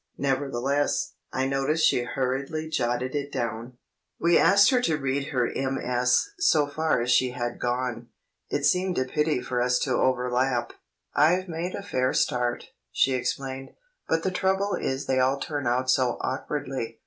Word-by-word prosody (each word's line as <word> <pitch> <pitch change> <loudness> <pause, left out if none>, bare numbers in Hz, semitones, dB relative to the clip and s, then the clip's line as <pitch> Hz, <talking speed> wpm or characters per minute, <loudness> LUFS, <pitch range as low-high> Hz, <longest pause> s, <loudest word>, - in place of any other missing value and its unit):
Nevertheless, 140 0 0 0.2
I 130 - -1
noticed 135 +4 +1
she - - +3
hurriedly 135 +5 -2
jotted 125 -3 -1
it 145 -1 -3
down. 120 -1 -4 0.4
We 170 +1 +3
asked 200 +3 +6
her 250 -1 +3
to 160 -10 +1
read 135 0 -2
her 125 -4 0
MS. 125 - +1
so 155 - +4
far 150 -2 0
as 120 +1 0
she 125 +1 +3
had 120 -1 -4
gone; 120 -1 -2 0.4
it 145 - -1
seemed 180 +2 +2
a 130 - +1
pity 150 0 0
for 125 -1 -1
us 125 0 +2
to 130 - -1
overlap. 125 -1 +1 0.4
"I've 175 +6 +3
made 170 +2 -4
a 200 - -6
fair 130 -10 0
start," 120 -1 0 0.2
she 135 - +2
explained, 130 +1 -3 0.3
"but 165 0 +1
the 190 - 0
trouble 190 +2 0
is 135 +1 -2
they 130 -1 +1
all 130 +2 +2
turn 145 -3 -3
out 125 +2 +1
so 130 -1 +2
awkwardly. 130 -3 -4
135 Hz, 160 wpm, -26 LUFS, 125-150 Hz, 0.4 s, asked